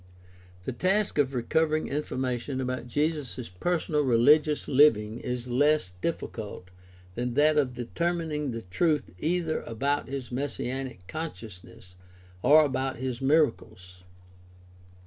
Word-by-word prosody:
— 90 0 -24
The - - -2
task 190 - +1
of 135 -2 +1
recovering 155 +6 +1
information 130 -2 -3
about 130 -2 -3
Jesus' 145 -3 -2
personal 155 - 0
rehgious 145 +5 +4
Hving 120 -6 +4
is 125 0 -4
less 145 -4 +2
difl&cult 105 - -4 0.4
than 120 +3 -3
that 150 +2 +4
of 135 -4 +1
determining 155 +3 -2
the 115 -2 -5
truth 145 - 0
either 165 - 0
about 140 +6 -1
his 135 -3 -5
messianic 130 -5 -4
consciousness 110 - -8 0.5
or 155 +6 +6
about 135 -1 -2
his 130 -1 -4
miracles. 110 - 0
130 Hz, 115 wpm, -27 LUFS, 120-150 Hz, 0.5 s, or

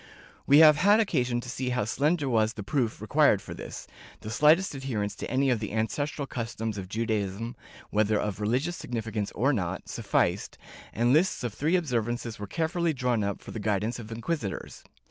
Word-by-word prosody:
^ - - -22 0.4
We 140 - +7
have 155 -2 +8
had 205 +6 +5
occasion 125 - +1
to 125 - -10
see 125 +1 -3
how 125 -4 0
slender 145 +6 +1
was 110 -3 +2
the 105 - -7
proof 115 +1 -1
required - - +4
for - - -9
this - - -8 0.2
— - - -19
the 110 - -6
slightest 155 - +4
adherence 115 -7 -3
to - - -5
any 135 +2 +2
of 120 - +1
the 105 -1 -5
ancestral 140 +6 -1
customs 115 -4 -4
of 90 -1 -7
Judaism, 110 +1 -2 0.4
whether 105 0 +2
of 105 -1 -3
religious 130 +11 0
significance 110 -7 -4
or 135 +6 +2
not, 95 -5 -3
sufficed, - - 0 0.3
and 120 +2 +2
lists 160 -2 +2
of 115 -4 -3
these 155 +5 +2
observances 120 -7 -2
were 105 - -5
carefully 165 - 0
drawn 125 -5 0
up 100 -1 -3
for - - -9
the 110 - -5
guidance 105 +3 -1
of 115 -1 -9
inquisitors. 115 - -4
120 Hz, 190 wpm, -28 LUFS, 110-145 Hz, 0.4 s, have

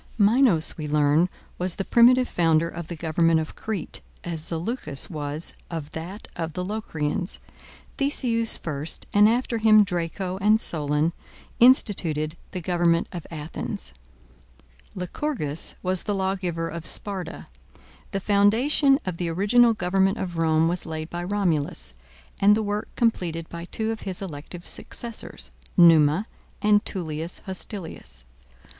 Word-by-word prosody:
Minos, 210 - +3
we 150 - -3
learn, 150 +3 +3 0.3
was 180 -1 +2
the 195 - -3
primitive 250 +2 +5
founder 165 -1 +2
of 170 -1 -7
the 170 - -5
government 165 0 +2
of 160 - -5
Crete, 215 -6 -4 0.2
as 165 -3 -1
Zaleucus 165 - -3
was 150 0 -4 0.2
of 160 -3 -5
that 175 +6 -7
of 165 -2 -4
the 180 - -3
Locrians. 180 -4 -2 0.6
Theseus 240 -5 +2
first, 150 -1 -2
and 210 +1 +6
after 235 0 0
him 215 -1 +6
Draco 180 0 -3
and 215 +2 +4
Solon, 150 -2 +1 0.5
instituted 170 - +3
the 185 - -5
government 170 -1 +1
of 175 -4 -7
Athens. 155 -1 -5 1.0
Lycurgus 180 - -1
was 185 -1 +1
the 205 - -2
lawgiver 185 -3 -1
of 165 -1 -6
Sparta. 195 -3 -3 0.6
The 195 - -2
foundation 225 +9 +4
of 185 -3 -3
the 175 -1 -2
original 220 +7 +4
government 195 +2 +1
of 180 -2 -4
Rome 160 0 +3
was 175 +1 -2
laid 160 0 -5
by 175 0 -4
Romulus, 165 - -1 0.5
and 205 +1 +6
the 220 - -1
work 205 0 -2
completed 170 -8 0
by 170 0 -7
two 220 +4 -2
of 225 - -5
his 190 -2 -4
elective 170 -1 -8
successors, 235 -2 -6 0.3
Numa 165 +1 +6 0.3
and 210 -1 +4
Tullius 165 -2 -5
Hostilius. 175 - -6
180 Hz, 135 wpm, -25 LUFS, 160-210 Hz, 1.0 s, and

